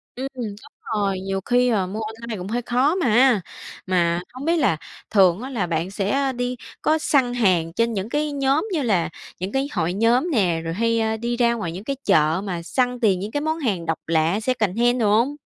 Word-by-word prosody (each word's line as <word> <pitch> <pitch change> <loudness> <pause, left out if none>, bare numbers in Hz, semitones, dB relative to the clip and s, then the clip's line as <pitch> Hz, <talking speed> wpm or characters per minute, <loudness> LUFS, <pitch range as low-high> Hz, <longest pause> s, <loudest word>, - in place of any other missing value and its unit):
Ừm, 260 +2 -3
đúng 220 -5 -4 0.4
rồi, 200 -3 0
nhiều 195 0 -3
khi, 250 0 +3
ờ, 200 -6 +1
mua 205 +4 -5
online 220 +1 -6
cũng 180 0 -6
hơi 235 +4 -1
khó 255 +7 +1
mà. 250 - +4 0.4
Mà 175 -2 +1
hông 260 +3 -7
biết 335 +1 +2
là 260 - +2 0.3
thường 190 -2 +4
á 260 - -6
là 220 -9 -2
bạn 165 +2 -2
sẽ, 195 0 -2
à, 275 -1 +1
đi 245 0 -2 0.3
có 315 - +3
săn 270 -5 +2
hàng 180 -8 +2
trên 230 +4 +1
những 200 +1 -3
cái 295 +3 -1
nhóm 280 +4 +1
như 320 - +1
là 190 - +1 0.3
những 185 +2 -3
cái 270 +1 0
hội 170 +2 0
nhóm 235 - +2
nè, 180 - +1
rồi 165 0 -3
hay, 230 +4 +1
a, 220 0 0
đi 235 +2 -2
ra 235 -1 +3
ngoài 175 -8 -3
những 180 +4 -7
cái 275 +4 -2
chợ 160 -2 +3
mà 180 -4 -4
săn 250 +6 0
tìm 200 -6 +2
những 205 +3 -5
cái 290 - -1
món 315 +1 -1
hàng 200 - -1
độc 165 -1 -1
lạ, 165 +4 +2
secondhand 240 +1 +1
đồ 210 - +3
hông? 265 +6 +1
225 Hz, 225 wpm, -22 LUFS, 185-250 Hz, 0.4 s, mà